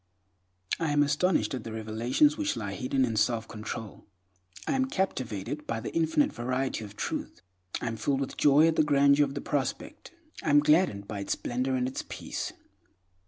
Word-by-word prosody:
I 165 - 0
am 145 0 +5
astonished 150 +5 +1
at 125 -4 -4
the 115 - -6
revelations 110 - +2
which 300 -2 -1
lie - - -4
hidden 130 0 +1
in 115 -2 -3
self 115 0 +1
control; 110 0 -7 0.6
I - - +1
am 265 -1 +2
captivated 150 - -3
by 115 -1 -1
the - - -6
infinite 165 - +2
variety 125 0 -2
of 105 -1 -10
Truth, - - -4 0.4
I - - -3
am 115 -1 -2
filled 135 +5 0
with 135 - -4
joy 145 +2 +5
at 165 - +1
the - - +5
grandeur 140 0 +5
of 140 0 -7
the - - -3
prospect; 275 - -3 0.3
I - - -2
am 145 0 +7
gladdened 150 - +3
by 105 - -5
its 100 - -1
splendor 130 +2 -1
and 125 0 0
its 130 - -4
peace. - - -4
135 Hz, 185 wpm, -29 LUFS, 115-150 Hz, 0.6 s, am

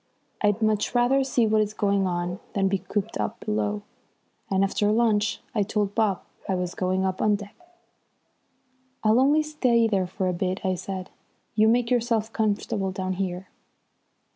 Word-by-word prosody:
I'd 210 +1 +2
much 215 +2 +1
rather 250 +3 +4
see 255 -3 +2
what 215 0 +3
is 210 0 -2
going 200 -2 +1
on 175 +1 -2
than 195 -1 +2
be 195 0 0
cooped 190 - -3
up 105 - -2
below, 105 -1 -1 0.7
and 195 0 +2
after 205 +1 +1
lunch 215 -2 +1
I 215 - +1
told 205 0 -1
Bob 210 -4 +1 0.3
I 190 - +2
was 180 -1 -2
going 185 +1 0
up 185 0 -2
on 210 -1 +3
deck. 205 0 -8 1.5
"I'll 220 +2 +4
only 290 +4 +4
stay 250 -7 +2
there 195 -4 0
for 185 +1 -2
a 180 - 0
bit," 185 +3 -2
I 185 - +2
said. 185 0 -5 0.4
"You 215 0 +4
make 235 +1 +2
yourself 230 -2 +1
comfortable 205 -2 0
down 185 0 -3
here." 185 0 -4
205 Hz, 165 wpm, -25 LUFS, 185-220 Hz, 1.5 s, rather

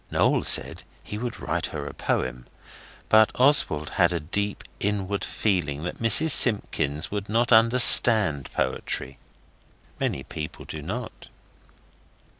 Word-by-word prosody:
Noel - - -1
said - - +1 0.2
he 105 - -9
would 120 0 -7
write - - -4
her 75 -2 -9
a 70 - -9
poem, 60 -1 -5 0.6
but 110 0 +2
Oswald 125 - +1
had - - +2
a 85 - -4
deep, 100 +6 -5 0.2
inward 100 -1 -4
feeling 80 -8 -4
that 90 - -8
Mrs 150 +8 +2
Simpkins 80 - +2
would 100 -1 -7
not 120 +3 -2
understand 115 - +6
poetry. 70 +1 -6 0.8
Many 65 - -4
people 75 +1 -10
do 80 - -10
not. 110 +10 -9
100 Hz, 125 wpm, -22 LUFS, 75-115 Hz, 0.8 s, understand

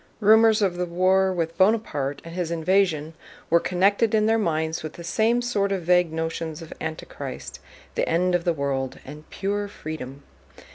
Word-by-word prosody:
Rumors 220 0 +5
of 180 -3 0
the 180 0 -1
war 185 +2 +2
with 165 -1 -3
Bonaparte 175 -10 +1
and 165 - -8
his 175 -2 -2
invasion 165 -2 +1 0.4
were 170 - +6
connected 200 +6 +2
in 215 -1 +3
their 225 +1 +3
minds 160 -4 -1
with 155 -1 -6
the 170 - -10
same 225 +7 +1
sort 200 -5 0
of 190 -3 -1
vague 180 -1 +3
notions 160 0 -3
of 160 - -9
Antichrist, 160 0 -6 0.3
the - - -1
end 180 +2 +2
of 175 -1 +1
the 175 - +2
world, 140 -4 -2
and 150 +3 -11
"pure 205 +1 -2
freedom." 145 -7 -8
175 Hz, 175 wpm, -24 LUFS, 160-200 Hz, 0.4 s, were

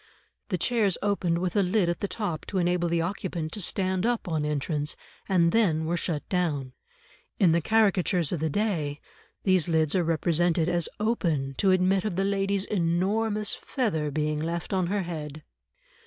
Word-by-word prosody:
The 185 - 0
chairs 210 -1 +2
opened 190 -5 +1
with 175 0 -2
a 205 - +4
lid 190 0 +2
at 175 -1 -1
the 200 - -2
top 195 -7 -4
to 195 - -3
enable 175 -1 +1
the 170 0 +1
occupant 170 -3 -3
to 210 - -4
stand 185 0 0
up 240 -3 0
on 160 -3 -1
entrance, 150 +1 -1 0.3
and 170 -3 +3
then 165 -8 +2
were 170 +2 0
shut 165 -3 -3
down; 150 -8 -1 0.6
in 185 -6 +4
the 170 +1 +2
caricatures 190 -5 +2
of 175 - -1
the 160 +1 0
day, 155 -6 -1 0.4
these 185 -3 +3
lids 160 -2 +2
are 185 - +2
represented 165 0 +1
as 175 -2 +1
open 170 -11 0
to 195 - +3
admit 185 +1 +3
of 210 -5 -2
the 195 - +1
lady's 195 0 0
enormous 205 +4 0
feather 185 - -2
being 150 +1 -1
left 170 +4 -3
on 185 -2 +1
her 200 +1 -1
head. 155 -3 -6
175 Hz, 175 wpm, -27 LUFS, 160-195 Hz, 0.6 s, a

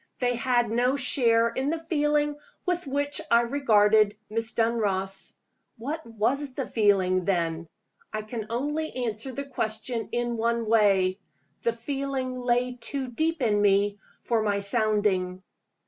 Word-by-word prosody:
They 245 -1 +1
had 240 -1 +1
no 250 +4 +2
share 235 -4 +3
in 260 +4 -2
the 330 - 0
feeling 295 -2 0 0.3
with 360 -3 -1
which 285 +2 -1
I 235 0 +6
regarded 215 -5 +3
Miss 225 +1 -1
Dunross. 200 -4 0 0.4
What 295 +8 -4
was 250 +5 -1
the 270 0 -3
feeling, 190 -4 +2
then? 170 -3 -1 0.4
I 215 0 -3
can 215 0 -6
only 295 +7 -2
answer 225 +3 -3
the 280 +2 -5
question 225 -3 -3
in 240 0 -1
one 230 0 0
way. 200 -4 +3 0.4
The 235 - +1
feeling 260 +1 -3
lay 245 0 0
too 270 -1 -3
deep 315 +4 -1
in 210 -3 +2
me 205 0 +3 0.2
for 230 -2 +1
my 205 -2 +1
sounding. 200 -3 +1
230 Hz, 140 wpm, -26 LUFS, 210-265 Hz, 0.4 s, I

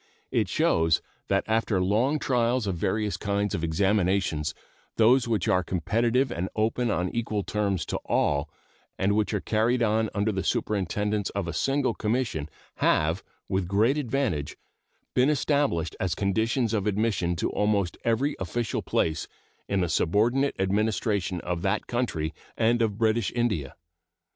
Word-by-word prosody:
It - - +1
shows 80 -1 +2 0.3
that 100 0 +2
after 110 -3 +1
long 110 +11 +2
trials 125 -3 +1
of 95 -3 -1
various 105 +4 -1
kinds 100 -1 -1
of 80 - -2
examinations 90 -3 +1 0.4
those 120 +2 +5
which 110 -6 0
are 90 - +3
competitive 115 - +1
and 95 -4 -3
open 115 +2 +1
on 90 -3 0
equal 110 -3 -1
terms 100 -5 -1
to - - -2
all, 70 +1 +1 0.5
and 100 +2 +1
which 110 -1 +1
are 105 - 0
carried 115 +5 +1
on 110 0 +2
under 105 +2 +1
the 95 -2 -2
superintendence 105 +1 -1
of 100 -3 -1
a 85 - -3
single 135 0 +1
commission, 105 - -1 0.3
have, 80 +4 +2 0.2
with 95 -2 -1
great 110 +8 +3
advantage, 120 - -1 0.6
been 125 +3 +4
established 140 - +1
as 95 -2 -1
conditions 110 +4 0
of 105 -2 0
admission 100 -4 0
to 85 - -1
almost 100 -4 +1
every 125 +6 +1
official 110 +5 -2
place 80 -2 -1 0.4
in 100 -1 +1
the 90 - +1
subordinate 115 - +2
administration 100 -1 0
of 85 -1 -3
that 95 0 0
country 85 -11 -2 0.2
and 115 +1 +2
of 105 -3 0
British 110 -1 +1
India. 105 - -1
105 Hz, 150 wpm, -27 LUFS, 95-115 Hz, 0.6 s, those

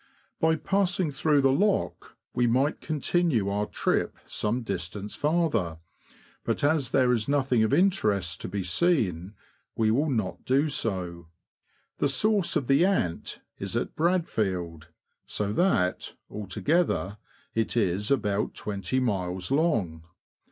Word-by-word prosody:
By 160 0 +3
passing 180 -2 0
through 145 +1 +2
the 135 -1 +4
lock, 200 +8 0 0.2
we 120 -1 +2
might 130 +6 +1
continue 155 - 0
our 105 +1 -1
trip - - -1
some 115 +4 -2
distance 100 +1 -4
farther, 145 - 0 0.7
but - - -1
as 145 -3 +2
there 130 -2 +3
is 110 -3 -1
nothing 135 -4 +2
of 110 - +2
interest 105 - +1
to - - -4
be 100 -2 -3
seen, 95 - 0 0.4
w^e 110 -1 +3
will 145 +7 +1
not 110 -8 -2
do 140 +4 +2
so. 90 - -3 0.7
The 145 - +2
source 200 +6 +2
of 150 -5 +1
the 135 +6 +4
Ant 180 - -1 0.2
is - - -2
at - - -3
Bradfield, 95 - -1 0.4
so 105 0 -2
that, 105 - +1 0.2
altogether, 105 - -1 0.3
it 115 +1 -1
is 100 -1 +1
about 105 -7 0
twenty 105 +5 -2
miles 95 -5 -2
long. 115 - +1
120 Hz, 130 wpm, -27 LUFS, 100-155 Hz, 0.7 s, the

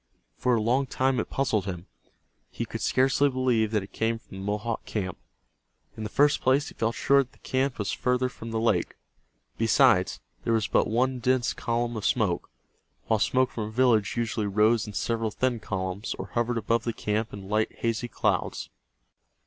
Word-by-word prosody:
For 125 -1 +2
a 110 - +1
long 130 +4 +2
time 130 0 +1
it - - -3
puzzled 110 -8 0
him. 90 -2 -5 0.6
He - - -4
could - - -6
scarcely 135 +2 +3
believe 125 -4 +1
that 105 -2 0
it 95 - -13
came 115 0 0
from 95 - -13
the - - -6
Mohawk 105 +3 -2
camp. 95 -5 -3 0.8
In - - -8
the 105 - -3
first 145 +4 +3
place 135 +3 +2
he - - -13
felt 115 +1 -1
sure 140 0 +4
that 130 - -8
the - - -22
camp 130 0 -1
was 105 - -2
farther 125 0 +1
from 115 -2 -9
the 115 0 -1
lake. 110 -6 +1 0.6
Besides, 115 -4 +4 0.2
there 115 - +1
was 110 -2 +2
but - - +2
one 125 +3 +1
dense 125 0 +1
column 120 0 -1
of 110 - -4
smoke, 100 -8 0 0.6
while 110 - +2
smoke 130 +4 +2
from 110 - -4
a - - -5
village 115 -3 +2
usually 110 -2 -1
rose 105 +3 +3
in 105 - -7
several 115 +1 -1
thin 125 +1 -1
columns, 95 +1 -3
or - - -6
hovered 120 0 0
above 115 +1 +1
the 115 - -2
camp 105 +1 -2
in 100 -1 -8
light 110 +2 +1
hazy 115 +1 -2
clouds. - - -1
115 Hz, 190 wpm, -27 LUFS, 105-125 Hz, 0.8 s, sure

